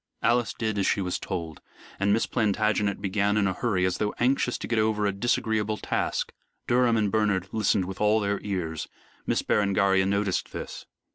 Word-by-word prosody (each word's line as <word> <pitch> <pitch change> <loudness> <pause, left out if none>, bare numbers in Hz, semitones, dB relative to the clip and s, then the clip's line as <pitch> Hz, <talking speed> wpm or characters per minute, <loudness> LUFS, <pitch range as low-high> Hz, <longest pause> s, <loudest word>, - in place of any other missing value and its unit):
Alice 120 -1 +2
did 110 -3 -1
as 95 - +1
she - - +2
was 90 -2 -2
told, 85 -4 -5 0.4
and 100 +1 +2
Miss 110 +2 +2
Plantagenet 105 -2 0
began 100 +1 +1
in 105 - +3
a 95 - +1
hurry, 95 -4 0
as 95 - -1
though 105 -1 -1
anxious 125 0 +1
to - - -6
get 115 -2 +1
over 110 -1 +1
a 100 - +2
disagreeable 110 0 0
task. - - -2 0.3
Durham 120 -1 +3
and 105 -2 +1
Bernard 105 -4 +1
listened 105 -3 +1
with 95 +2 -7
all 105 +1 +4
their 100 -1 -1
ears. 85 -6 -3 0.4
Miss - - +1
Berengaria 100 -2 +2
noticed 100 -1 0
this. - - -7
105 Hz, 185 wpm, -26 LUFS, 95-110 Hz, 0.4 s, all